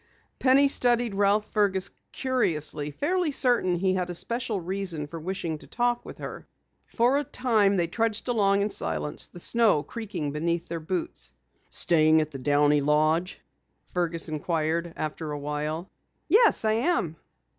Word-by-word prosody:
Penny 275 +2 +5
studied 240 -4 +2
Ralph 205 +1 +1
Fergus 195 -3 +1 0.2
curiously, 155 - 0
fairly 335 - -1
certain 245 -10 +2
he 185 +2 +1
had 180 -1 -2
a 175 - -4
special 235 +2 -1
reason 180 -3 -1
for 165 +3 -8
wishing 170 -2 -4
to - - -16
walk 240 0 +1
with - - -10
her. - - -8 0.4
For 250 +4 +2
a - - -2
time 220 -7 +2
they 175 - +2
trudged 225 +6 -1
along 200 -4 +2
in 205 - -2
silence, 75 -2 -1
the 175 - -12
snow 220 -6 +3
creaking 200 -11 -5
beneath 170 +3 -2
their 170 0 -3
boots. 160 - -4 0.4
"Staying 160 -1 +4
at 155 0 -2
the 135 - -7
Downey 145 +2 +3
Lodge?" 155 +5 +1 0.4
Fergus 170 -2 -1
inquired 160 +2 -2
after 155 0 -4
awhile. 150 +3 -4 0.4
"Yes, 435 - +4
I 215 - +3
am." 230 - 0
180 Hz, 150 wpm, -26 LUFS, 155-230 Hz, 0.4 s, Penny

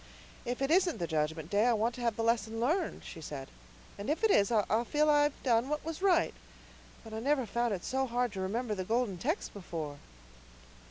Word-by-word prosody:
"If 245 +3 -2
it 270 - +1
isn't 355 -3 +3
the 175 - -2
Judgment 160 0 -2
Day, 205 +3 +3
I 245 - +4
want 225 +2 +1
to 245 - -8
have 235 -2 +1
the 225 - -2
lesson 225 -1 +1
learned," 320 +9 0
she 165 - -8
said, 140 -3 -7 0.5
"and 200 - -4
if 310 +8 -1
it 440 - +5
is 200 - +4
I'll 220 +1 +2
feel 300 +5 +2
I've 290 -1 +2
done 240 0 +2
what 300 0 -2
was 325 +1 -5
right. 360 -4 +3 0.7
But 225 -1 -10
I 220 - -3
never 270 +1 +1
found 235 +2 0
it 175 - -8
so 265 0 0
hard 245 0 0
to 195 -2 -5
remember 215 +4 -1
the 190 -2 -2
Golden 220 -2 0
Text 315 - -2
before." 160 -7 -6
235 Hz, 215 wpm, -32 LUFS, 200-280 Hz, 0.7 s, it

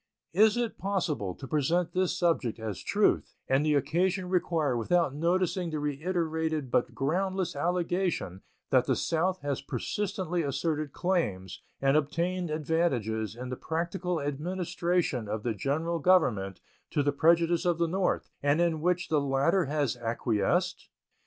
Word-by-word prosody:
Is 215 +5 +5
it 240 -2 -2
possible 165 - -1
to 135 - -9
present 160 +5 +1
this 185 -1 0
subject 165 -10 +1
as 110 -4 -5
truth - - +1
and 135 +2 +3
the 150 -1 +2
occasion 180 +6 +1
require 165 -7 +1
without 145 +5 +1
noticing 175 +3 0
the 155 - -3
reiterated 160 -1 -1
but - - +1
groundless 185 +5 -1
allegation 175 - -1 0.3
that - - +4
the - - +2
South 180 +3 0
has 145 -2 -2
persistently 185 - -2
asserted 150 0 -1
claims 135 - -1 0.2
and 135 +1 +3
obtained 170 +4 0
advantages 135 -9 0
in 125 +1 -6
the 125 - -3
practical 170 +3 -2
administration 170 - -1
of 105 +1 -3
the 120 - 0
General 160 - -1
Government 120 - +2 0.3
to 145 - +1
the 145 - +2
prejudice 165 +3 +3
of 175 -2 +1
the 170 0 +1
North, 185 +2 -1
and 145 +2 +2
in 170 -3 +1
which 180 +1 0
the 150 -2 +2
latter 140 +7 +2
has 145 -3 0
acquiesced? 115 -3 0
160 Hz, 145 wpm, -29 LUFS, 135-180 Hz, 0.3 s, Is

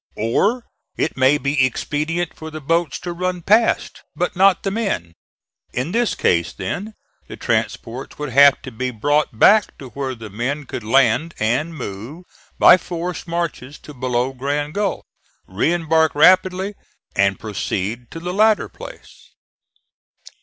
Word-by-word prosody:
Or, 205 - +1 0.3
it 160 - -1
may 130 +2 +4
be 140 -1 +1
expedient 155 +6 -2
for 160 - -8
the 155 0 -7
boats 165 +1 0
to 175 - -4
run 180 0 -3
past, 220 +5 +2
but 180 - -2
not 190 0 +4
the 195 - -1
men. 195 - -2 0.6
In 130 +7 -2
this 235 +2 +1
case, 85 -1 +1
then, 195 - -5 0.3
the - - -9
transports 125 +4 -3
would 150 -1 -4
have 140 +2 +6
to - - -8
be 130 +3 -3
brought 140 +2 0
back 210 - +5
to 130 - -10
where 130 +1 -4
the 110 -3 -10
men 135 +8 -3
could 120 - -6
land 135 +7 +2
and 125 +10 -1
move 125 - -7 0.3
by - - +8
forced 175 -1 -5
marches 165 -5 -4
to 150 - -12
below 125 0 -1
Grand 145 +3 -2
Gulf, 205 -1 -2 0.4
re 100 - 0
embark 160 -2 +2
rapidly 185 +5 +4 0.4
and 100 0 +2
proceed 110 +2 -4
to 165 - -8
the 175 +2 -4
latter 215 +2 +3
place. - - -13
150 Hz, 150 wpm, -20 LUFS, 125-175 Hz, 0.6 s, by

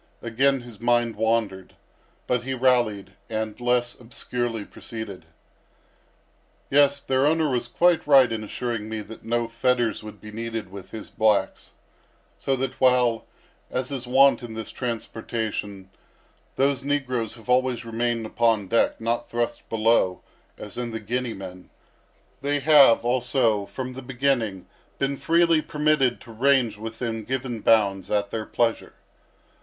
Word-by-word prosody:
Again 130 +4 +2
his 120 -4 -12
mind 120 -1 +1
wandered; 110 -4 -1 0.5
but 125 -1 0
he 130 +1 -3
rallied, 120 -7 +1 0.2
and 110 +1 -4
less 120 0 +1
obscurely 120 -2 -4
proceeded. 100 -7 -8 1.4
"Yes, 140 0 +4
their 135 +1 +2
owner 160 0 +2
was 125 -3 -1
quite 170 +6 +2
right 135 -4 +6
in 110 -1 -3
assuring 115 0 -4
me 110 -1 -4
that 105 +2 -11
no 120 +1 0
fetters 120 -1 0
would 105 -1 -10
be 105 - -10
needed 115 -2 -5
with 95 -1 -10
his 110 -2 -9
blacks; 105 -3 0 0.7
so 135 - 0
that 130 0 -4
while, 125 -3 +3 0.4
as 130 +2 -3
is 130 -3 -5
wont 135 +2 +5
in 115 -2 -8
this 110 0 -6
transportation, 110 -4 -4 0.6
those 135 -1 +1
negroes 130 -6 -1
have 115 0 -16
always 125 -2 +1
remained 115 0 -1
upon 110 -3 +1
deck—not 115 +2 0
thrust 120 0 -3
below, 110 -4 +2 0.3
as 105 +3 -7
in 120 -1 -3
the 110 -1 -5
Guinea 120 +2 -3
men—they 95 +9 -7
have, 140 -6 +6
also, 120 -4 +1
from 130 -1 -6
the 130 - -8
beginning, 125 -7 -1 0.3
been 140 0 0
freely 165 +1 +3
permitted 150 -5 +1
to 120 - -12
range 125 -1 +2
within 115 +1 -5
given 125 -1 -3
bounds 100 -4 +2
at 105 -1 0
their 110 -1 -4
pleasure." 115 -1 -1
120 Hz, 140 wpm, -24 LUFS, 110-130 Hz, 1.4 s, right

